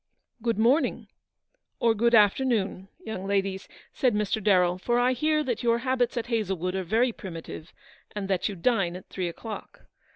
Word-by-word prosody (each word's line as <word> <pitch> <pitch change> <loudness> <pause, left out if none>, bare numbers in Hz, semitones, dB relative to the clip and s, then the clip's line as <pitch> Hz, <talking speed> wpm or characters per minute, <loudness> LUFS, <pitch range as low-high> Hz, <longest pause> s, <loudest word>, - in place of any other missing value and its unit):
" - - -41
Good 230 -2 0
morning, 245 +8 +2 0.7
or 230 -1 +3
good 235 +2 +3
afternoon, 205 -3 +2 0.2
young 195 -3 -5
ladies," 195 -1 -1 0.3
said 250 -5 +1
Mr. 210 0 -1
Darrell, 180 -3 +3
"for 240 +5 0
I 245 +1 +3
hear 305 +4 +1
that 250 -5 -2
your 235 -1 +2
habits 250 -1 0
at 235 - -1
Hazlewood 195 -7 -1
are 190 - -1
very 230 +7 +2
primitive, 165 -4 -8 0.4
and 200 -2 -3
that 190 +1 0
you 200 - -5
dine 190 -3 +1
at 185 - -11
three 185 -2 -3
o'clock. 215 +6 -8
215 Hz, 170 wpm, -27 LUFS, 190-240 Hz, 0.7 s, or